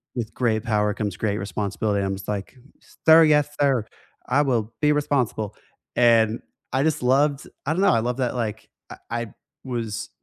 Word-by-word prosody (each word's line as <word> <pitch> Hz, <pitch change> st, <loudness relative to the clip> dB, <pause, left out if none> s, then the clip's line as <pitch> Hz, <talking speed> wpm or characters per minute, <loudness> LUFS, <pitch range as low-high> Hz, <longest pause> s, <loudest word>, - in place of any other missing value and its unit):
"With 115 Hz, -3 st, -4 dB
great 110 Hz, -3 st, 0 dB
power 105 Hz, -3 st, +1 dB
comes 100 Hz, -3 st, -3 dB
great 105 Hz, -2 st, -1 dB
responsibility." 100 Hz, +1 st, -2 dB
I'm 95 Hz, 0 st, -1 dB
just 95 Hz, -, -10 dB
like, 100 Hz, +3 st, -4 dB, 0.5 s
"Sir, 160 Hz, +1 st, +9 dB
yes, 150 Hz, -1 st, +3 dB
sir. 135 Hz, -6 st, +2 dB, 0.4 s
I 145 Hz, -, +3 dB
will 115 Hz, -5 st, -1 dB
be 150 Hz, 0 st, +4 dB
responsible," 130 Hz, -8 st, -1 dB, 0.4 s
and 115 Hz, -2 st, +4 dB, 0.3 s
I 130 Hz, +1 st, +1 dB
just 155 Hz, -5 st, 0 dB
loved 140 Hz, +2 st, +2 dB, 0.2 s
I 150 Hz, -, +1 dB
don't 180 Hz, -, -1 dB
know. 200 Hz, -, +5 dB
I 115 Hz, -, +3 dB
loved 125 Hz, +3 st, -2 dB
that, 125 Hz, -1 st, -1 dB
like, 110 Hz, -3 st, -4 dB, 0.2 s
I -, -, -9 dB
I 120 Hz, 0 st, -2 dB, 0.4 s
was 115 Hz, -5 st, -4 dB
115 Hz, 175 wpm, -23 LUFS, 105-135 Hz, 0.5 s, Sir